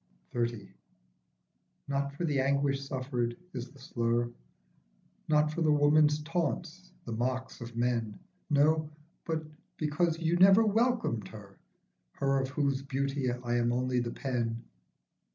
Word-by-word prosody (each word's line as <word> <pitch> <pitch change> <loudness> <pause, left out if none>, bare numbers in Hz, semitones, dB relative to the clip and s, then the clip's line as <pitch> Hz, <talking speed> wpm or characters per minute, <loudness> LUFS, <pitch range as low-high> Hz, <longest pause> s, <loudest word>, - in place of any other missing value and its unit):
33 120 -3 -1
XXX. - - -19 1.2
NOT 140 0 -1
for 175 - -2
the 145 -4 +1
anguish 140 +1 +1
suffered 125 -3 -2 0.2
is 125 -1 -5
the 140 - -18
slur, 120 -2 -1 1.0
Not 150 0 +3
for 170 - -3
the 155 -2 +4
woman's 150 0 +4
taunts, 170 +2 -3
the 115 - -5
mocks 125 +3 -2
of 120 0 -8
men; 115 -3 0 0.3
No, 155 +1 +3 0.4
but 160 -1 -1 0.3
because 160 +2 +1
you 165 +1 +1
never 195 +4 +7
welcomed 225 - +1
her, 100 -3 -12 0.6
Her 135 0 +1
of 130 - -3
whose 140 -1 0
beauty 135 -1 -1
I 120 0 -2
am 120 0 +2
only 125 +1 +1
the 120 -1 -1
pen. 120 -3 -2
135 Hz, 135 wpm, -30 LUFS, 120-155 Hz, 1.2 s, never